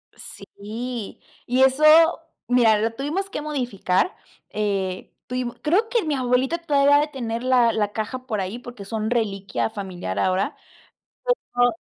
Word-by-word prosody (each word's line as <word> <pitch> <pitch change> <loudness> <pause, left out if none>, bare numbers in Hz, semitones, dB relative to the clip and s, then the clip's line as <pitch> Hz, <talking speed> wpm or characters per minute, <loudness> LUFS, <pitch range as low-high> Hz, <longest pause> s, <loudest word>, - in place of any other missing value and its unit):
Sí, 225 +2 -7 0.3
y 250 +2 +2
eso 265 +3 +3 0.6
mira, 235 -3 +4
lo 225 +2 0
tuvimos 305 +10 -3
que 300 - -4
modificar, 250 - -1 0.3
eh, 195 -3 -2 0.2
tuvimos 250 -1 -3
Creo 395 +9 +2
que 470 -2 +1
mi 310 -2 -1
abuelita 255 +4 +1
todavía 285 -3 +4
ha - - +5
de 300 - +1
tener 235 -5 -4
la 250 -2 +4
la 210 -2 0
caja 255 +4 -4
por 215 -5 -1
ahí, 190 +6 -4
porque 245 -4 -10
son 220 +1 -2
reliquia 205 -5 -1
familiar 190 - -5
ahora, 185 +1 +1 1.0
pero 245 0 +4
245 Hz, 145 wpm, -23 LUFS, 210-265 Hz, 1.0 s, ha